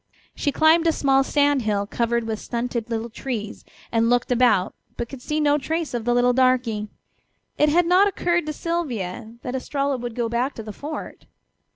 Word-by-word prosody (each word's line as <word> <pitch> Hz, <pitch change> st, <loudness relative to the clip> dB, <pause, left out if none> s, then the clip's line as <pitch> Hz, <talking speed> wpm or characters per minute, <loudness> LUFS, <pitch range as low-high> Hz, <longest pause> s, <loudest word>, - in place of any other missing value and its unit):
She 285 Hz, -, -1 dB
climbed 320 Hz, +3 st, +4 dB
a -, -, +5 dB
small 270 Hz, -3 st, +3 dB
sand 285 Hz, -1 st, +2 dB
hill 205 Hz, -2 st, 0 dB
covered 235 Hz, +2 st, 0 dB
with 220 Hz, -1 st, -3 dB
stunted 235 Hz, -1 st, -3 dB
little 230 Hz, 0 st, -3 dB
trees 220 Hz, -4 st, -5 dB, 0.3 s
and 230 Hz, 0 st, +2 dB
looked 245 Hz, +1 st, +1 dB
about, 230 Hz, -6 st, +3 dB, 0.2 s
but 235 Hz, -, -3 dB
could 265 Hz, +1 st, -10 dB
see 300 Hz, +4 st, -2 dB
no 295 Hz, -1 st, +3 dB
trace 320 Hz, +2 st, -3 dB
of 235 Hz, -2 st, -3 dB
the 240 Hz, -, +2 dB
little 245 Hz, 0 st, +4 dB
darky. 250 Hz, -4 st, +2 dB, 0.7 s
It 300 Hz, -, +5 dB
had 345 Hz, +3 st, +3 dB
not 365 Hz, +4 st, +5 dB
occurred 345 Hz, -4 st, 0 dB
to -, -, -1 dB
Sylvia 235 Hz, -, -4 dB
that 250 Hz, -, -4 dB
Estralla 275 Hz, +1 st, -1 dB
would 240 Hz, -2 st, -6 dB
go 240 Hz, -2 st, 0 dB
back 240 Hz, +4 st, -1 dB
to 225 Hz, -, -7 dB
the 215 Hz, -1 st, -7 dB
fort. 300 Hz, +6 st, -7 dB
250 Hz, 190 wpm, -23 LUFS, 230-295 Hz, 0.7 s, a